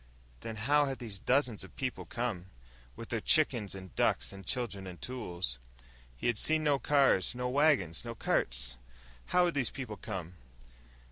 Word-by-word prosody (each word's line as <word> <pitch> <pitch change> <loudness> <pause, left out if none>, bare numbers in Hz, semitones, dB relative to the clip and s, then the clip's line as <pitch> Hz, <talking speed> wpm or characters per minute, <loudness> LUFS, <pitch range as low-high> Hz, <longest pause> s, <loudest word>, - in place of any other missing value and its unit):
Then 115 - -6
how 145 +7 +3
had 135 -1 -3
these 110 -6 -5
dozens 125 -5 +1
of 95 -4 -13
people 130 -2 -3
come, 115 -7 -3 0.5
with 115 - -8
their 115 -2 -1
chickens 120 -10 +2
and 95 -2 -9
ducks - - +1
and 95 0 -9
children 100 -3 -2
and 90 -2 -8
tools? 90 - -4 0.6
He - - -7
had 120 -3 +2
seen 155 0 +3
no 145 -2 +3
cars, 135 -9 +3
no 125 0 -1
wagons, 130 - +3
no 115 -1 -5
carts. - - 0 0.5
_How 180 0 +5
had 175 - +1
these 135 -4 +2
people 120 -6 -6
come? 95 -5 -5
115 Hz, 165 wpm, -32 LUFS, 95-135 Hz, 0.6 s, How